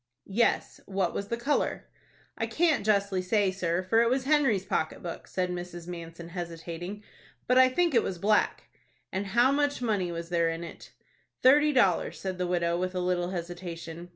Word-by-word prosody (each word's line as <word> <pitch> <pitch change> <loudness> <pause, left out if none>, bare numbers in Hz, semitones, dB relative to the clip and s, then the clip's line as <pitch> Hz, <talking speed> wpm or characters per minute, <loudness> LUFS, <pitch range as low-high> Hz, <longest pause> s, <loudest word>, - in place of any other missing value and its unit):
"Yes, 220 +4 0
what 190 -3 -1
was 200 - -3
the 235 - -2
color?" 275 +5 0 0.5
"I 225 - -2
can't 310 +2 +2
justly 200 -2 +2
say, 195 +1 +2
sir, 180 -1 -1
for 225 +5 +3
it 235 - +3
was 260 +1 +1
Henry's 265 -9 +2
pocket 160 - -2
book," 170 -2 -6
said 180 -1 -2
Mrs. 175 -1 -6
Manson, 170 -1 -8
hesitating; 175 +3 -6 0.4
"but 250 +1 +4
I 260 0 +7
think 340 +4 +1
it 230 - +5
was 185 - -3
black." 210 +4 +2 0.5
"And 195 +1 -2
how 240 +6 +4
much 285 0 +1
money 205 -7 0
was 170 0 -5
there 170 -1 +2
in 165 +1 -4
it?" 170 - -10 0.5
"Thirty 295 +3 +6
dollars," 200 - +2
said 185 -1 -4
the 180 - 0
widow, 170 -1 0
with 185 0 -2
a - - 0
little 180 -1 0
hesitation. 175 -1 -6
185 Hz, 180 wpm, -28 LUFS, 175-230 Hz, 0.5 s, I